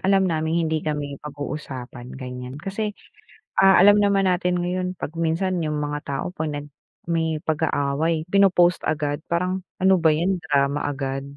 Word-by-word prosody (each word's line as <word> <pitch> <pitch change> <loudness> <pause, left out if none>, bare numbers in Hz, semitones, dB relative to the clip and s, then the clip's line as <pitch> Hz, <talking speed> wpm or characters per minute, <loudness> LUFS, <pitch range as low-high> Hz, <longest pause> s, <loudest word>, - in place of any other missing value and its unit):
alam 195 -1 +4
naming 160 -2 0
hindi 160 0 0
kami 145 -2 -4
pag-uusapan, 135 -4 -7
ganiyan. 125 0 -7
Kasi, 200 +6 -4 0.6
ah, 195 0 +6
alam 205 +3 +8
naman 195 -1 +3
natin 180 0 +1
ngayon 180 +1 -2
'pag 160 - -5
minsan 165 +3 0
yung 150 -1 -1
mga 145 0 -2
tao, 140 -1 -3
'pag 155 -1 -2
nag 145 0 -5 0.4
may 160 -2 0
pag-aaway, 155 +1 0
pino-post 180 -2 +4
agad, 150 -1 -1
parang 180 +2 0 0.2
ano 190 0 +5
ba 165 -3 +4
yan, 175 +3 0
drama 140 0 +1
agad. 135 -1 -3
160 Hz, 155 wpm, -23 LUFS, 145-180 Hz, 0.6 s, alam